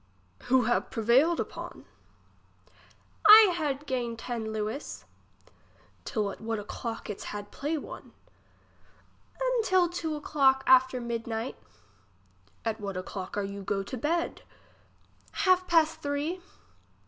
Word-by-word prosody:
Who 255 0 +4
have 240 +2 0
prevailed 255 +9 +3
upon? - - -6 1.4
I 425 -3 +10
had 295 -3 -2
gained 240 -4 -2
ten 225 -2 -4
lewis. 220 +6 -4 1.0
Till 210 -5 -1
at - - -11
what 225 0 -2
o'clock 225 +2 -6
its 210 - -6
had 205 0 -6
play 300 +3 -2
one? - - -9 1.3
Un - - +1
till 370 -3 +3
two 330 -2 -3
o'clock 270 -3 +2
after 260 0 +5
mid 235 -1 -4
night 225 +2 -3 1.1
At 225 -1 -2
what 195 -2 -4
o'clock 185 +1 -6
are 205 - 0
you 200 0 -6
go 195 0 -2
to 230 - -6
bed. 325 +7 -1 0.9
Half 370 -1 +3
pass 325 -2 +4
three. 310 +3 -3
260 Hz, 125 wpm, -28 LUFS, 220-320 Hz, 1.4 s, I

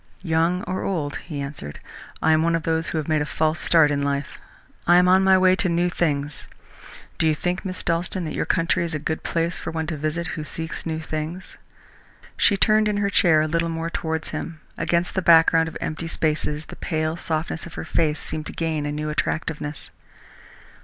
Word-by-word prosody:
"Young 170 +2 +1
or 185 - -3
old," 150 -7 -2
he 150 -3 -7
answered, 140 - -7 0.4
"I 160 - +5
am 155 0 +4
one 165 +1 +2
of 165 - -2
those 160 +1 0
who - - -2
have 155 - -2
made 155 -2 +2
a - - 0
false 155 +1 0
start 160 -3 +4
in 140 -1 0
life. 140 0 -2 0.5
I 175 - +7
am 180 0 +5
on 190 +1 +5
my 190 0 +6
way 185 0 +5
to 185 - +1
new 175 +1 +1
things. 145 -4 -1 0.7
Do 160 - +3
you 155 - +3
think, 180 +4 -2
Miss 185 -1 -4
Dalstan, 175 +1 -1
that 155 - -4
your - - -2
country 165 -1 +1
is 165 -2 -3
a - - +1
good 160 +2 -3
place 165 +1 -1
for - - -5
one 160 -1 -2
to 160 0 -3
visit 155 +3 -2
who 155 - -4
seeks 160 +2 -5
new 160 -1 -2
things?" 160 +3 -5 0.8
She 200 - +3
turned 215 +1 +4
in 210 -1 0
her 200 -1 0
chair 160 -4 +5
a - - 0
little 165 +1 0
more 165 0 -3
towards 160 -1 -2
him. 155 +1 -5 0.2
Against 170 +1 0
the 190 - 0
background 165 -1 +5
of - - -8
empty 160 +1 -4
spaces, 155 -1 -1
the - - -10
pale 155 0 -1
softness 165 0 -3
of 165 - -12
her - - -5
face 155 -2 +1
seemed 155 0 -5
to - - -6
gain 160 -3 -1
a - - -2
new 150 +1 -3
attractiveness. 150 -1 -3
160 Hz, 215 wpm, -23 LUFS, 155-170 Hz, 0.8 s, I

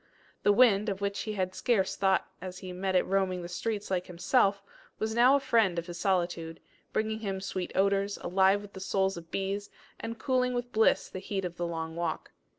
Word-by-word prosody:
The 205 - +4
wind, 210 -2 +5
of 195 -1 -3
which 200 0 -2
he 215 - -3
had 185 -2 -1
scarce 195 -4 +1
thought 190 -1 +2
as 185 0 -6
he 185 -1 -7
met 190 +1 -2
it 180 - +5
roaming 185 -2 0
the - - -5
streets 210 +3 -3
like 180 -1 0
himself, 195 +3 +2 0.3
was 220 0 -2
now 245 +4 +6
a - - +3
friend 225 -9 +2
of 170 - -2
his 175 0 -7
solitude, 175 -4 -1 0.3
bringing 220 0 -1
him 195 -3 -3
sweet 190 -2 -4
odours, 200 +1 +2
alive 190 +3 +2
with 205 - -12
the 190 - -8
souls 190 0 0
of 165 -1 -10
bees, 195 +2 -2 0.3
and 230 0 -5
cooling 250 +1 +1
with 245 0 -3
bliss 220 +1 +3
the 185 - -7
heat 195 0 -3
of 175 -1 -6
the 175 - -1
long 160 -1 -4
walk. 170 -1 -3
195 Hz, 210 wpm, -29 LUFS, 180-210 Hz, 0.3 s, now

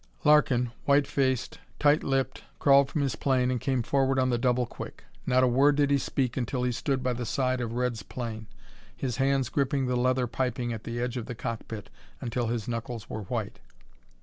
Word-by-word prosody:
Larkin, 135 -5 +4
white 140 0 +4
faced, 130 -3 -1 0.2
tight 145 +1 +4
lipped, 135 -1 -1 0.2
crawled 140 -1 +5
from 150 - -1
his 135 - -1
plane 130 -2 +1
and 125 - -2
came 130 -3 0
forward 135 +2 +1
on 130 -1 +2
the 120 - +2
double 125 0 +2
quick. - - -9 0.2
Not 130 0 +4
a - - +5
word 140 +4 +4
did 145 -1 +2
he 140 - +4
speak 130 -2 -1
until 125 0 -1
he 125 - +1
stood 130 +2 -1
by 125 -1 +1
the 120 +1 -4
side 130 +1 0
of 115 -1 -3
Red's 120 -2 -1
plane, 110 -2 -6 0.5
his 125 -3 -3
hands 135 -1 +2
gripping 140 -1 0
the 125 0 0
leather 125 +1 +2
piping 120 -1 -2
at 110 - -7
the 120 0 -4
edge 125 +1 -2
of 120 - -4
the 125 - -5
cockpit 110 -2 -6 0.3
until 120 -1 -2
his 115 -2 -2
knuckles 115 -1 -5
were 110 - -4
white. - - -4
125 Hz, 200 wpm, -28 LUFS, 120-135 Hz, 0.5 s, crawled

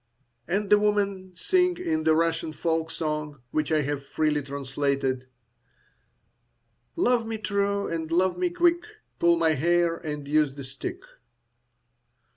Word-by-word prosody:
And 195 +4 -1
the 210 - +7
woman 200 -3 0
sings 360 - +1
in 155 - -1
the 160 0 +5
Russian 165 -1 0
folk 165 0 -1
song, 150 -3 -3
which 155 0 -1
I 155 -1 +3
have 145 -1 -3
freely 150 +1 0
translated, 135 -1 -2 1.7
Love 245 -9 +2
me 225 0 -3
true, 200 -1 0
and 165 -1 -4
love 180 +1 +2
me 180 0 0
quick, 345 - +2 0.3
Pull 170 0 +5
my 165 -1 +3
hair, 170 +3 +2
and 150 -4 -6
use 150 -2 +2
the 140 - -7
stick. 135 - -7
165 Hz, 135 wpm, -26 LUFS, 150-200 Hz, 1.7 s, the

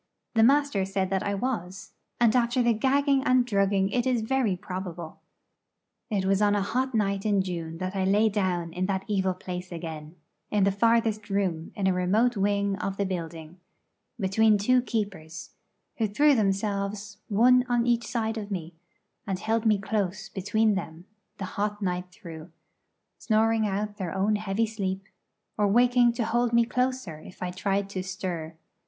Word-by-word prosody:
The 225 - +3
master 275 -4 +3
said 190 0 -2
that 190 -1 +1
I 200 0 -1
was, 195 -5 -4 0.3
and 235 -1 +4
after 245 +1 +2
the 235 -1 +3
gagging 275 +4 +2
and 255 -2 +3
drugging 195 -3 +1
it 245 +1 0
is 245 -3 +1
very 235 -4 +1
probable. 180 -4 -7 0.9
It 200 -4 0
was 195 +1 +2
on 205 0 +3
a 205 - +1
hot 255 +5 -1
night 200 -2 0
in 205 -3 +2
June 165 -3 -5
that 185 +2 -4
I 190 - 0
lay 205 +3 +3
down 185 -5 -1
in 185 +1 -1
that 190 -1 -2
evil 190 -3 0
place 180 0 -7
again, 160 -2 -7 0.3
in 210 -2 +2
the 200 - +3
farthest 220 0 +1
room 185 -5 -1
in 200 - -2
a 190 - +3
remote 210 +7 +2
wing 200 0 0
of 195 0 -3
the 200 - 0
building, 170 -2 -6 0.6
between 210 +2 +3
two 250 +5 +3
keepers, 200 -10 -4 0.5
who 225 - +1
threw 290 +9 +4
themselves 200 -1 -1
one 250 +4 +5
on 240 -1 +2
each 235 -1 +1
side 225 -1 -2
of 205 -1 -7
me, 175 -4 -5 0.5
and 195 -2 -1
held 225 +3 0
me 215 -1 +4
close 205 0 -2
between 210 +3 +1
them 170 -3 -5 0.3
the 195 - -4
hot 205 +2 -3
night 180 -2 -2
through, 170 -4 -10 0.7
snoring 220 0 +2
out 205 +1 -3
their 185 -2 -4
own 205 +2 +2
heavy 210 +1 0
sleep, 195 -3 -3 0.6
or 205 - +4
waking 245 +3 +4
to 235 -1 -1
hold 240 +1 +1
me 235 0 +5
closer 250 -9 -2
if 180 - -10
I 180 - -2
tried 195 +2 -1
to 185 - -3
stir. 180 -4 -5
200 Hz, 170 wpm, -27 LUFS, 185-225 Hz, 0.9 s, one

